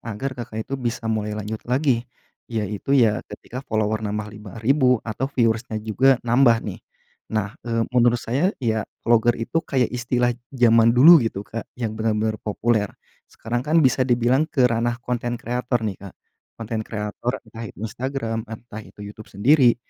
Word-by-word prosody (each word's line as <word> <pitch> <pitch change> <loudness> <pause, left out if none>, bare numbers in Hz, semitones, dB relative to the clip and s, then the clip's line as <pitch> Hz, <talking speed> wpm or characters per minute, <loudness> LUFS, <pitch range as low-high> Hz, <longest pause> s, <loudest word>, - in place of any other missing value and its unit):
agar 115 +4 -4
Kakak 110 -3 -6
itu 135 - -5
bisa 120 -1 -3
mulai 105 -1 -2
lanjut 105 +1 -5
lagi, 125 -2 +1 0.4
yaitu 110 +4 -1
ya 110 -5 +3
ketika 125 - -8
follower 110 0 0
nambah 105 0 -4
5000 120 +6 +1
atau 115 +4 -3
viewers-nya 115 -3 0
juga 130 +5 +4
nambah 120 0 +5
nih. - - -6 0.6
Nah, 105 -1 -1
eee, 115 -1 -1
menurut 120 -1 +4
saya 140 +10 +1
ya 110 -4 -1 0.2
vlogger 120 0 +3
itu 115 +8 -1
kayak 130 -7 0
istilah 120 0 0 0.2
zaman 115 -3 +4
dulu 160 +6 +9
gitu 110 -4 -3
Kak, 115 +2 -7
yang 115 -4 -3
benar-benar 110 0 -1
populer. 110 0 0 0.4
Sekarang 120 +2 -3
kan 150 +5 0
bisa 130 0 +3
dibilang 125 +5 +2
ke 130 -6 +2
ranah 120 0 +1
konten 120 0 -2
kreator 120 0 -2
nih 100 -3 -2
Kak, 100 -2 -10 0.4
konten 115 -1 -4
kreator, 105 +2 -4
entah 115 0 -9
itu - - -14
Instagram, 115 -1 -3
entah 110 -1 -8
itu - - -16
YouTube 105 +1 -10
sendiri, 125 +4 +4
115 Hz, 160 wpm, -23 LUFS, 110-125 Hz, 0.6 s, dulu